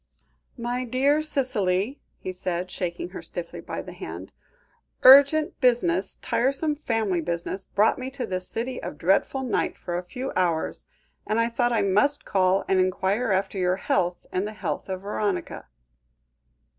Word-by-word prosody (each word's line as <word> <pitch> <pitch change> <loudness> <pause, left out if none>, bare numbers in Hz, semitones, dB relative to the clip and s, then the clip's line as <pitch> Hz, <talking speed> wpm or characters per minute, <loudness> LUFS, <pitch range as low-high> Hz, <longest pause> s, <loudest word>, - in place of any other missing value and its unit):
"My 245 +1 -2
dear 270 +5 +2
Cicely," 250 -6 -1 0.2
he 185 - -5
said, 180 0 -3
shaking 185 - -4
her - - -8
stiffly - - -7
by - - -5
the - - -9
hand, - - -8 0.7
"urgent 280 +4 +7
business, 195 -7 +2
tiresome 275 +5 +1
family 225 - -1
business, 170 +3 -3
brought 210 +5 +2
me 255 +1 -4
to 265 -2 -4
this 185 -2 -3
city 245 +3 -3
of - - -6
dreadful 195 - +1
night 250 - -1
for 175 - -5
a - - -7
few 255 +9 -5
hours, 170 -3 0 0.4
and 215 +2 +1
I 230 0 +2
thought 240 +1 +1
I 225 -3 +2
must 210 +9 +2
call 190 0 +2
and 190 - +3
enquire 190 +5 +1
after 195 +1 0
your 180 0 +2
health, 175 -2 -1
and 190 +3 -1
the 215 - -6
health 210 - -4
of 185 -1 -3
Veronica." 205 -1 -3
205 Hz, 155 wpm, -25 LUFS, 185-255 Hz, 0.7 s, urgent